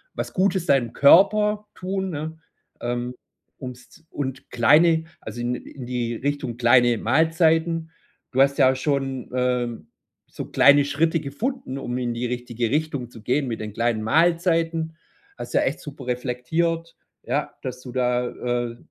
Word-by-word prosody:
was - - -4
Gutes 190 -2 +1
deinem 125 -5 +2
Körper 210 +7 +5
tun, 190 +1 -3
ne, 160 +1 -5 0.4
ähm, 120 +1 -3 0.4
ums 125 +3 -10
und 135 -2 -5
kleine 160 +6 +4 0.2
also 120 - -7
in 120 +1 -1
in 130 0 -9
die 120 -1 -2
Richtung 140 -2 -3
kleine 120 0 +4
Mahlzeiten. 160 +4 +2 0.4
Du 130 - +3
hast 140 0 +3
ja 130 0 +5
schon, 135 -2 -2
ähm, 125 -2 -1 0.4
so - - -7
kleine 145 0 +5
Schritte 160 +3 +1
gefunden, 145 - -4
um 125 -3 -4
in 120 -1 -2
die 120 +1 -2
richtige 120 -1 -3
Richtung 145 -4 -1
zu 115 - -12
gehen 130 +5 0
mit 115 -2 -3
den 105 -1 -6
kleinen 115 0 0
Mahlzeiten. 165 - +1 0.4
Hast - - -7
ja - - +4
echt - - -1
super 140 -3 -10
reflektiert, 160 +7 -2 0.3
ja, - - -2
dass 125 -1 -5
du 125 - -9
da, 125 -1 0 0.4
äh, 115 - -10
135 Hz, 150 wpm, -23 LUFS, 125-160 Hz, 0.4 s, Körper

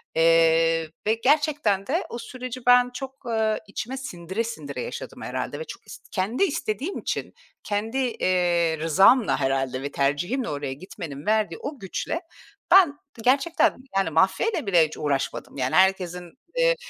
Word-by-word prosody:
Eee, 165 0 +4 0.2
ve 215 - +4
gerçekten 280 -9 +2
de 335 +7 0
o - - -5
süreci 255 0 -7
ben, 245 0 +6
çok, 270 +1 -8
ııı, 220 -2 0
içime 240 +6 -5
sindire 190 -4 -4
sindire 155 -12 -6
yaşadım - - -7
herhâlde - - -4
ve - - -3
çok - - -11
ist - - -12
kendi 215 - 0
istediğim 285 - -2
için, - - -4 0.3
kendi, 215 +4 -2
eee, 180 -9 +1
rızamla 190 - +4
herhâlde 135 -1 0
ve 140 +1 -4
tercihimle 175 - 0
oraya 145 -2 -3
gitmenin 150 -2 -8
verdiği 210 -6 +1
o 285 -1 -6
güçle 195 - -3 0.5
ben, 345 -7 +6 0.3
gerçekten, 275 +7 +3 0.2
yani, 195 -4 +2
mafyayla 190 - +1
bile 175 -5 +5
hiç 155 - -10
uğraşmadım. 140 -1 -2
Yani, 130 -1 0
herkesin, 180 -2 +2 0.2
eee, - - +3
195 Hz, 145 wpm, -25 LUFS, 165-255 Hz, 0.5 s, ben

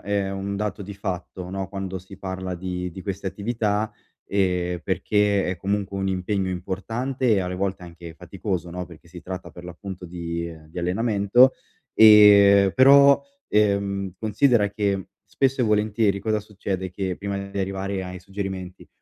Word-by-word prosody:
è 100 -1 -1
un 100 +1 -4
dato 105 0 -3
di 100 +1 -7
fatto, 90 -2 -5
no, 95 -1 -4
quando 95 -1 -5
si 95 +2 -13
parla 95 -1 -5
di 90 0 -4
di 95 +2 -9
queste 100 0 -5
attività, 105 +1 -1 0.3
e 90 -3 0
perché 105 -1 +1
è 90 -1 -2
comunque 100 0 -2
un 95 0 -1
impegno 95 +1 -1
importante 115 +8 -3
e 100 - +3
alle 90 0 -3
volte 95 0 -2
anche 85 -1 -10
faticoso 90 -2 -4
no, 90 +1 -5
perché 85 0 -15
si 85 0 -11
tratta 95 0 -7
per 85 - -12
l'appunto 90 +1 -8
di, 85 -1 -4
uhm, 80 -2 -13
di 90 - -7
allenamento, 105 +6 +3 0.4
e 100 -2 +7
però, 140 +1 +7 0.3
ehm, 100 -2 +1
considera 110 -1 +2
che 100 -3 -1
spesso 135 0 0
e 125 - +3
volentieri 105 -1 +1
cosa 110 +1 -1
succede, 95 -2 -4
che 95 -1 -3
prima 100 0 -3
di 100 - -5
arrivare 95 0 -2
ai 90 0 -7
suggerimenti, 95 -1 -6
95 Hz, 160 wpm, -24 LUFS, 90-105 Hz, 0.4 s, e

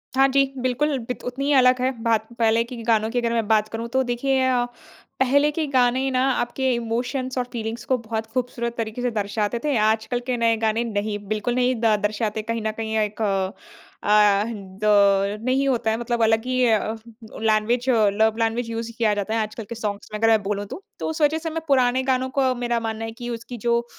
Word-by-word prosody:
हाँ 270 +1 +5
जी, 275 +1 +4 0.2
बिल्कुल 270 +3 0
बित 250 - -5
उतनी 260 +3 -3
ही 290 - +2
अलग 255 -1 +5
है 260 - +2
बात। 225 -1 +1
पहले 225 0 +3
की 235 +2 -9
की 230 - -7
गानों 220 -1 +2
की 245 - 0
अगर 235 -1 -1
मैं 225 -2 0
बात 215 -1 +3
करूँ 230 +1 -4
तो 265 0 +3
देखिए 260 +2 0
अ, 245 -1 +2 0.5
पहले 285 +3 +4
के 315 0 -2
गाने 260 0 +2
ना 255 0 +1
आप 240 -1 -1
के 265 -1 +1
इमोशन्स 250 +3 -2
और 250 - +1
फीलिंग्स 225 0 -4
को 260 - +1
बहुत 225 -1 -4
ख़ूबसूरत 235 -1 -2
तरीके 225 +1 -3
से 245 - 0
दर्शाते 210 +1 -1
थे। 295 -2 +1
आज 220 +1 +2
कल 245 +2 -2
के 250 -1 0
नए 230 -1 +3
गाने 220 +1 0
नहीं, 210 -2 -2
बिल्कुल 215 +3 -1
नहीं 255 0 +2
द 220 -2 +4
दर्शाते 215 +1 -1
कहीं 230 - -2
ना 215 0 -1
कहीं 220 0 -3
अ, 215 - +3
एक 210 +1 -3
अ, 195 -2 0 1.3
दौर 200 -1 +4
नहीं 265 +2 +1
होता 240 -4 +1
है 220 - 0
मतलब 235 0 -1
अलग 225 +1 +2
ही 255 0 +1
अ, 220 -1 +1 0.5
लैंग्वेज 225 +3 +1
अ, 220 -5 +4
लव 220 +1 +2
लैंग्वेज 230 +1 0
यूज़ 230 0 -4
किया 220 -3 +2
जाता 205 +1 -2
है 225 - +1
आजकल 215 +1 -5
के 235 - -5
सॉन्ग्स 210 -2 -4
में, 210 - -3
अगर 225 - +3
मैं 220 -1 +4
बोलूँ 205 0 -2
तो। 370 - -9 0.2
तो - - -3
उस 320 0 -4
वजह 300 +1 +3
से 325 0 -4
मैं 325 +1 -4
पुराने 260 -2 +3
गानों 260 0 0
को 260 -1 +3
मेरा 240 -1 -1
मानना 225 0 -4
है 225 - -5
कि 240 +1 -7
उसकी 235 +1 -6
जो 235 +1 0
235 Hz, 230 wpm, -23 LUFS, 220-255 Hz, 1.3 s, हाँ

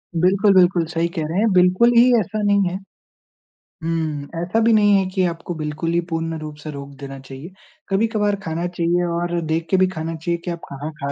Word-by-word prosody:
बिल्कुल, 195 +4 +3
बिल्कुल, 180 -2 +4
सही 170 0 -1
कह 160 - -1
रहे 165 - -3
हैं। 220 0 +2
बिल्कुल 185 +6 +4
ही 235 - +8
ऐसा 215 +2 -3
नहीं 200 -3 +2
है। 185 - -4 1.1
हुँ, 160 -3 -2
ऐसा 180 +6 0
भी 225 0 +4
नहीं 205 -1 +5
है 190 - +1
कि 185 0 0
आपको 170 0 -4
बिल्कुल 155 +1 -3
ही 170 - +3
पूर्ण 165 0 -2
रूप 155 -1 -7
से 155 - -5
रोक 140 -1 -8
देना 135 -1 -8
चाहिए। 135 +6 -10 0.4
कभी-कभार 210 0 +1
खाना 165 +1 -2
चाहिए 175 0 0
और 175 0 -1
देख 160 +1 -2
के 190 - +3
भी 185 - +4
खाना 165 -2 -4
चाहिए 170 +2 -2
कि 175 - -2
आप 170 - -5
कहाँ 145 +3 -6
खा 140 0 -2
170 Hz, 210 wpm, -21 LUFS, 160-190 Hz, 1.1 s, ही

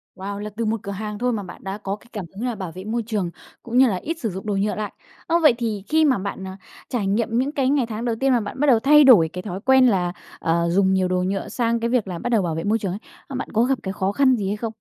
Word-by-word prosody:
Wow, 200 +2 -5
là 210 +1 -5
từ 230 - -1
một 220 0 0
cửa 200 - -5
hàng 210 +1 -5
thôi 250 0 +1
mà 205 -2 -3
bạn - - -11
đã 195 +1 -4
có 200 -1 -4
cái 235 - -20
cảm 200 -5 -4
hứng 230 +5 -4
là 240 - -2
bảo 185 -4 -6
vệ 185 - -7
môi 225 +2 -2
trường 205 -6 -1 0.3
cũng 240 +1 -2
như 260 0 +7
là 195 - 0
ít 330 - -4
sử 225 - -2
dụng 190 +3 -7
đồ 205 -2 -1
nhựa 205 +2 0
lại, 215 -1 -4 0.3
ờ, 340 +1 +3
vậy 300 -6 +6
thì 215 -5 -3
khi 315 0 +3
mà 265 -6 +3
bạn, 195 0 -5
ờ, 190 - -6 0.4
trải 225 -7 -1
nghiệm 230 +3 0
những 270 +3 +1
cái 270 -3 0
ngày 280 -4 +2
tháng 225 +1 -5
đầu 230 -2 0
tiên 270 0 +2
mà 245 - +4
bạn 210 +5 -6
bắt 295 - +2
đầu 235 -4 +5
thay 295 +4 +6
đổi 200 -12 +7
cái 180 - -4
thói 190 -2 -5
quen 265 -1 +5
là, 180 -5 +1 0.3
ờ, 170 +1 +1
dùng 190 +1 +3
nhiều 185 -1 +2
đồ 180 0 0
nhựa 195 +1 -2
sang 235 -1 0
cái 235 +1 -1
việc 240 -5 +1
là 175 -2 -5
bắt 245 - -3
đầu 225 -4 +3
bảo 165 -3 -2
vệ 165 - -3
môi 220 +2 +1
trường 195 -3 -3
ấy, 200 - -5 0.3
ờ, 270 - -7
bạn 265 - -4
có 225 +2 +3
gặp 260 -2 +1
cái 190 0 -3
khó 190 0 -1
khăn 260 +2 +4
gì 200 -4 -2
hay 205 +2 -1
không? 225 0 -4
215 Hz, 320 wpm, -22 LUFS, 195-245 Hz, 0.4 s, như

